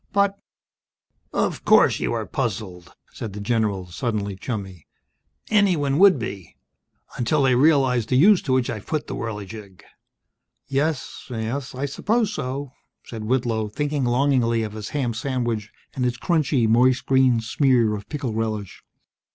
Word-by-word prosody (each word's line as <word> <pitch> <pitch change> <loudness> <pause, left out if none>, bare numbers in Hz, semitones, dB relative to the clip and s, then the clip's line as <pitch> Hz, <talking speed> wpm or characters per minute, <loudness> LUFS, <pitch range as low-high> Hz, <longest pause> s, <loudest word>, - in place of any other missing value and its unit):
"But 200 0 +2 0.5
" - - -49 0.2
"Of - - -8
course - - +5
you - - -1
are - - -2
puzzled," 95 -6 -4 0.2
said 110 -4 -6
the 105 - -6
general, 105 -3 0
suddenly 100 +2 -3
chummy. 95 - -6 0.6
"Anyone 170 -9 +2
would 195 -3 +7
be. 100 -7 -7 0.6
Until 130 +4 +1
they 130 -1 +4
realized 130 -4 +3
the 130 - +2
use 185 +8 +6
to 135 - -3
which 130 -2 +2
I've 110 -3 -7
put 155 -2 -2
the - - -6
Whirligig!" 105 -3 -7 0.8
"Yes. 140 +1 -2
Yes, 125 +3 -4
I 135 +3 -2
suppose 215 - 0
so 135 -3 -4 0.2
..." - - -57
said 110 -2 -6
Whitlow, 115 -3 0
thinking 145 +4 -2
longingly 120 -2 +2
of 105 -1 -5
his 110 -1 -6
ham 130 -5 -1
sandwich, 115 -3 -2 0.2
and 130 - -2
its 125 0 0
crunchy, 150 -6 +1
moist 125 +3 +3
green 130 -3 +4
smear 120 -1 +2
of 100 -1 -7
pickle 140 -6 -3
relish. 110 -3 -4
120 Hz, 150 wpm, -23 LUFS, 110-140 Hz, 0.8 s, would